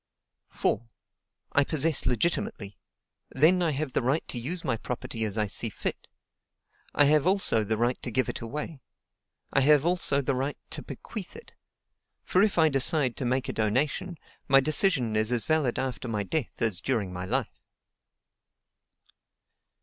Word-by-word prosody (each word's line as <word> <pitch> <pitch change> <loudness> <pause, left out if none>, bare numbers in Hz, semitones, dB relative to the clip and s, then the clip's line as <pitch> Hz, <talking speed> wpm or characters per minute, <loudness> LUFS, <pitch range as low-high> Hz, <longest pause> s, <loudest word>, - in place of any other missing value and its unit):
"4. 115 +3 -1 0.6
I 140 - +4
possess 155 -1 0
legitimately: 125 - -1 0.5
then 165 +7 +3
I 170 - +2
have 145 -2 -3
the - - +1
right 130 +6 0
to 120 - -3
use 165 +9 -3
my - - 0
property 115 -1 -4
as 110 -1 -1
I 105 - +2
see 100 - -1
fit. - - -5 0.9
I - - +6
have 150 +2 +3
also 185 - +3
the 110 +1 -1
right 120 +2 0
to - - -4
give 130 +3 +1
it - - -5
away. 145 +5 -5 0.7
I - - +4
have 145 +1 +5
also 175 -5 +2
the 140 - 0
right 135 +3 -2
to - - -4
bequeath 210 -5 -8
it; 465 - -12 0.7
for 185 - +2
if 205 -2 +2
I 160 -1 +5
decide 135 -2 +3
to 130 - -3
make 130 +1 0
a - - -3
donation, 140 - -1 0.3
my 135 0 +6
decision 140 - +1
is 110 +2 +2
as 120 -3 +1
valid 155 -6 +1
after 130 -1 -3
my 105 -3 -2
death 140 +2 -2
as 100 -5 +1
during 105 -8 -1
my 90 0 -5
life." - - -2
135 Hz, 165 wpm, -27 LUFS, 115-155 Hz, 0.9 s, I